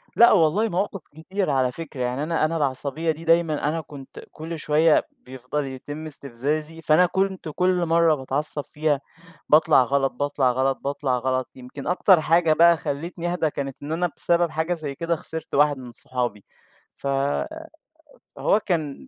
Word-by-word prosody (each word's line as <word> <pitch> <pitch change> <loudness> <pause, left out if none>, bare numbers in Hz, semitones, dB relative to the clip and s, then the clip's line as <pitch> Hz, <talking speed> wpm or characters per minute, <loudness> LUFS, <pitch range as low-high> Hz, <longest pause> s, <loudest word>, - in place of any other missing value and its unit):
لا 235 - +7
والله، 195 +4 +3
مواقِف 195 -1 -2
كتيرة 180 +3 -3
على 130 -2 +1
فكرة. 145 -3 -8
يعني 125 +3 -1
أنا 160 0 +1
أنا 165 +1 -1
العصبية 145 +3 -1
دي 160 +2 -8
دايمًا، 165 -3 +2
أنا 165 +1 -2
كنت 140 -3 -12
كل 160 +1 -7
شوية 155 +2 +3
بيفضَل 130 +3 -5
يتم 145 +4 -7
استِفزازي، 150 +3 -3
فأنا 155 +3 +4
كنت 190 -1 -1
كل 180 -1 +2
مرَّة 165 -1 +3
باتعصَّب 145 +2 -2
فيها 150 -2 -1 0.5
باطلَع 155 -2 +5
غلَط، 135 +1 0
باطلَع 140 -1 0
غلَط، 130 +1 0
باطلَع 140 -2 -1
غلَط. 130 0 -1
يمكن 130 +2 -9
أكتَر 180 0 +4
حاجة 165 0 +3
بقى 170 +2 +6
خلَّتني 170 +4 -4
أهدا 175 -3 0
كانت 140 -2 -6
إن 145 +2 -5
أنا 175 +2 +1
بسبَب 170 -1 +1
حاجة 160 +3 -1
زي 150 -4 -5
كده 170 +3 -1
خسِرت 160 +1 -7
واحد 145 0 +4
من 125 -2 -10
صحابي، 120 -5 -4 0.5
ف - - -10 1.3
فهو 205 - +2
كان 155 -6 -2
155 Hz, 160 wpm, -24 LUFS, 135-165 Hz, 1.3 s, لا